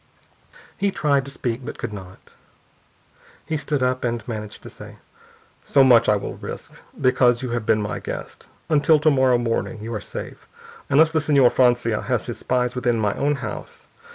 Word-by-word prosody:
He 200 - +2
tried 140 -7 +1
to 140 - -8
speak, 120 -3 -3
and 130 - -8
could 115 -3 -5
not. 95 -2 -12 1.1
He 160 - -2
stood 145 -2 -1
up, 130 0 0
and 120 -3 -2
managed 105 -3 -6
to - - -9
say: - - -12 0.7
"So 140 - +4
much 125 -3 +5
I 105 - +5
will 100 - -5
risk, - - -8 0.2
because 125 -2 +3
you 125 - -3
have 120 -2 -3
been 105 -1 +2
my 105 - -4
guest. - - -7 0.2
Until 155 +1 +4
to 155 +1 +4
morrow 130 -3 +3
morning 115 -1 -2
you 115 +1 -5
are 105 - -3
safe, - - -8 0.4
unless 155 +3 +5
the 160 - +2
Señor 140 -4 +4
Francia 120 -3 +2
has - - -1
his - - -6
spies 125 -1 0
within 120 -2 0
my 105 -2 +1
own 145 +1 0
house. - - -8
125 Hz, 180 wpm, -22 LUFS, 115-140 Hz, 1.1 s, much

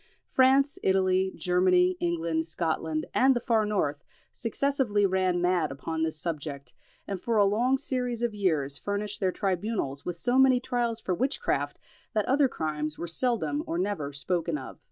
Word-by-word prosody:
France, 270 +2 +4
Italy, 190 0 +2
Germany, 180 0 +3
England, 165 -1 -1
Scotland, 160 -1 -2
and 265 +1 +4
the - - +1
far 225 -3 +1
north 150 -9 -1 0.3
successively 235 -3 0
ran 185 -2 +1
mad 175 -4 +1
upon 160 +4 -4
this 160 -1 -1
subject, 145 -5 -5 0.3
and 195 -3 -4
for 230 -2 0
a 205 - +5
long 240 +7 +2
series 250 -3 -2
of 235 -2 0
years 155 -9 +1
furnished 205 +1 -2
their 190 -2 +1
tribunals 185 -8 -2
with 180 - -4
so 245 +9 +1
many 260 -2 +5
trials 240 -2 -1
for 190 - -2
witchcraft, 260 - -1 0.4
that 215 -3 +1
other 275 +2 +3
crimes 155 -6 -3
were - - -4
seldom 165 - 0
or 165 - -2
never 180 -6 -2
spoken 165 +3 -1
of. 130 - -9
185 Hz, 160 wpm, -28 LUFS, 160-230 Hz, 0.4 s, a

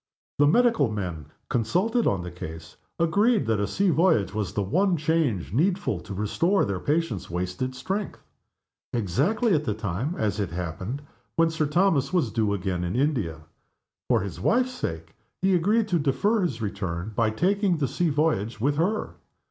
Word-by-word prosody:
The 145 - +6
medical 225 - +4
men, 90 -8 -4 0.2
consulted 185 - +1
on 95 -3 +1
the 90 - -6
case, 80 -1 -8 0.2
agreed 205 +7 +3
that 110 -2 +1
a 100 - 0
sea 195 -2 +1
voyage 160 - +3
was 105 -3 -2
the 100 - -1
one 180 - +2
change 150 - 0
needful 175 - +1
to 100 +2 -8
restore 165 - +1
their 100 -3 -2
patient's 150 - -1
wasted 90 +9 -3
strength 190 +10 -3 0.7
exactly 145 - +1
at 155 -2 +2
the 110 -7 -1
time, 110 - -3
as 105 -1 -1
it 100 -4 -1
happened, 90 - -4 0.3
when 165 0 +3
Sir 155 -2 0
Thomas 150 -4 +2
was 165 -11 +1
due 110 -2 +1
again 90 -2 -2
in 90 +3 -2
India. 120 - 0 0.7
For - - +3
his 95 -3 -6
wife's 250 - +2
sake, 80 - -5 0.3
he 190 0 +2
agreed 205 +6 +2
to 175 -3 +2
defer 155 +11 +1
his 130 -11 -2
return, 100 -1 -3
by 115 0 +2
taking 185 - +1
the 140 -3 0
sea 170 +7 0
voyage 140 -8 0
with 145 +5 +1
her. 200 +7 -1
130 Hz, 170 wpm, -26 LUFS, -, 0.7 s, The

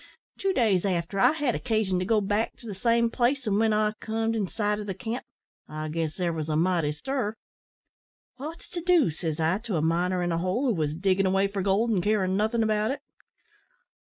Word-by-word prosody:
Two 390 - +1
days 215 - +2
after, 185 0 -1
I 240 - +5
had 295 -6 0
occasion 215 -6 0
to 180 - -1
go 215 +1 +2
back 205 +3 0
to - - -16
the 215 - -5
same 230 +3 +2
place, 255 +3 +1
an' 205 -1 +1
when 220 0 +3
I 215 0 +2
comed 225 +1 -1
in 210 -4 0
sight 210 +1 -1
o' - - -4
the 195 -2 -4
camp, 230 +4 -4 0.5
I 155 0 -4
guess 160 -1 -2
there 175 -2 -1
was 160 -1 -4
a 155 - 0
mighty 165 -2 +2
stir. 230 - -3 1.0
"`Wot's 315 +5 -7
to 345 - -5
do?' 340 - +4
says 160 0 -4
I 165 +5 +1
to 220 -4 -4
a 155 - +1
miner 175 +2 +1
in 175 - 0
a 165 - 0
hole, 185 +10 0
who 245 - +3
wos 155 -4 -1
diggin' 190 +2 +2
away 195 +1 +2
for 200 0 -3
gold, 200 +5 +2
and 195 -5 +2
carin' 190 -1 +1
nothin' 220 +3 +1
about 215 0 +1
it. 275 +2 -3
205 Hz, 220 wpm, -27 LUFS, 180-230 Hz, 1.0 s, I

